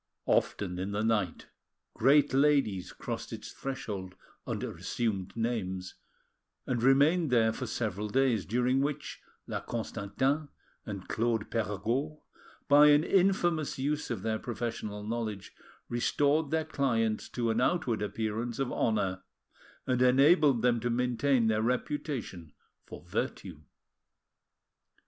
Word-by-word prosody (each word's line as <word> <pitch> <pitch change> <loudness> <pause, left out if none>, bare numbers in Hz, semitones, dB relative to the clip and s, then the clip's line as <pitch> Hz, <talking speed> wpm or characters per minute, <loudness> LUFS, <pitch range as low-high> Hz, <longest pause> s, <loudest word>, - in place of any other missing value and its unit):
Often 90 -3 0
in 95 +2 -3
the 105 +1 -1
night 105 -6 0 0.5
great 140 +4 +4
ladies 135 -10 +2
crossed - - -6
its - - -7
threshold 100 -9 -5 0.3
under - - -3
assumed 105 -4 -3
names 95 -6 -2 0.7
and 120 -3 -1
remained 145 +6 +4
there 115 -2 +3
for 130 - -5
several 105 -2 -3
days, 125 -4 +2
during 125 +4 +2
which 145 +1 -3 0.2
La - - -3
Constantin 130 +6 -2 0.4
and 100 -3 -6
Claude 115 -1 -1
Perregaud, 115 +8 -2 0.5
by 145 +1 +7
an 145 +1 +6
infamous 175 -5 +2
use 145 +3 -2
of 110 -6 -4
their 110 -1 -1
professional 110 -3 -4
knowledge, 110 -3 -4 0.3
restored 145 +5 +1
their 160 +1 0
clients 115 -8 0
to 115 -2 -1
an 115 +2 0
outward 125 -8 +1
appearance 110 +3 -3
of 135 -2 -1
honour, 95 -5 0 0.6
and 125 -1 0
enabled 135 0 +5
them 120 -1 +3
to 120 +2 -2
maintain 125 +1 +1
their 110 -1 +2
reputation 120 - -3 0.3
for - - -10
virtue. 85 -6 -4
120 Hz, 120 wpm, -30 LUFS, 105-140 Hz, 0.7 s, by